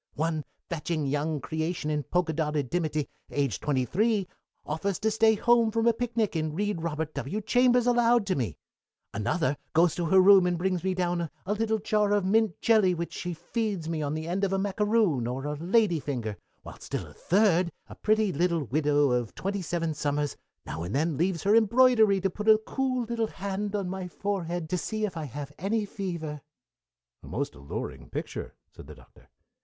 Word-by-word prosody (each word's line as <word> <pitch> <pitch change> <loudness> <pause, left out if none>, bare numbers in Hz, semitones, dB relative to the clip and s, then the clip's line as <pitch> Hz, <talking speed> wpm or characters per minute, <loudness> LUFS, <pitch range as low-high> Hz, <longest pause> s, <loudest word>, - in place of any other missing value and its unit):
One 155 0 -1 0.2
fetching 160 -2 -2
young 145 +2 -1
creation 160 +1 -2
in 150 -1 0
polka 170 +3 0
dotted 150 -4 -1
dimity, 155 -4 -1 0.2
aged 140 -8 -1
twenty 135 -4 0
three, 210 - +1 0.4
offers 170 +5 -2
to 220 +1 0
stay 220 0 +4
home 235 +1 +4
from 225 +1 0
a 235 - +5
picnic 225 -4 -1
and 155 -1 -1
read 205 -2 -1
Robert 160 -1 -3
W. 140 +8 -3
Chambers 245 +2 +3
aloud 240 -2 +4
to 190 - 0
me. 110 - -2 0.6
Another 130 - 0 0.2
goes 165 0 +4
to 175 - -2
her 190 +4 +5
room 190 -1 +7
and 175 -1 0
brings 180 -1 -1
me 190 -1 0
down 175 -2 -1 0.2
a 200 - 0
little 220 +1 0
jar 210 -1 +1
of 205 -2 +2
mint 215 -2 +2
jelly, 210 -6 +4
which 170 0 -4
she 175 -1 -4
feeds 205 -1 -3
to 165 - -3
me 160 -2 -2
on 145 0 -2
the 160 +1 -4
end 185 +3 -1
of 195 - +1
a 195 - +1
macaroon 200 - +1
or 130 +3 -4
a 150 - -2
lady 180 +1 +2
finger, 120 -8 -3 0.3
while - - -11
still - - -4
a - - -14
third, 185 -3 +2 0.2
a - - -10
pretty 215 -2 +1
little 170 +1 +1
widow 145 +1 +2
of 120 -2 -1
twenty 200 +1 -2
seven 165 -2 -2
summers, 145 -1 -1 0.3
now 80 +2 -5
and 90 +7 -4
then 155 +2 +1
leaves 170 +2 0
her 205 +2 +4
embroidery 225 -2 +5
to 190 - +1
put 210 +3 -2
a 215 - +8
cool 255 +3 -2
little 230 -1 -1
hand 200 +1 -4
on 200 -3 -1
my 185 0 -4
forehead 175 -3 -3
to 180 +2 -1
see 215 +3 -2
if 200 - -5
I 160 -2 -4
have 140 +2 -7
any 210 +4 0
fever 170 -7 -5 0.4
" - - -64
"A - - -11
most - - -3
alluring 70 -1 -7
picture," - - -5 0.2
said - - -13
the - - -10
Doctor. - - -20
180 Hz, 200 wpm, -28 LUFS, 150-210 Hz, 0.6 s, a